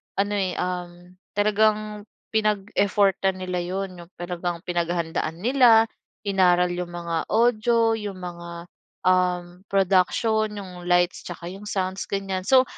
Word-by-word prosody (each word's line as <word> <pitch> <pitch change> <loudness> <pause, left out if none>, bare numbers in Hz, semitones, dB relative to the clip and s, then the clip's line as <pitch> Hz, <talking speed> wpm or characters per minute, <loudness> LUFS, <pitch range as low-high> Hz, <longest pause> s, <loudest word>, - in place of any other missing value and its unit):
ano, 205 +1 0
eh, 185 -2 0
um, 180 0 -5 0.2
talagang 210 0 +1 0.2
pinag-effortan 200 -2 +1
nila 180 -1 -2
'yon, 185 +1 -4
'yong 170 +1 -13
talagang 175 -1 -4
pinaghahandaan 170 -2 -1
nila, 230 +2 +5 0.4
inaaral 180 -3 +3
'yong 175 0 -3
mga 170 -1 -3
audio, 230 0 +3
'yong 205 -2 -5
mga, 170 -1 -8 0.3
um, 180 -1 +2 0.2
production, 200 +3 +2
'yong 180 -3 -8
lights, 175 0 +2
'yung 180 +4 -8
sounds, 190 -1 -2
ganyan. 195 -2 -3
So 260 -1 +6
185 Hz, 115 wpm, -24 LUFS, 175-205 Hz, 0.4 s, So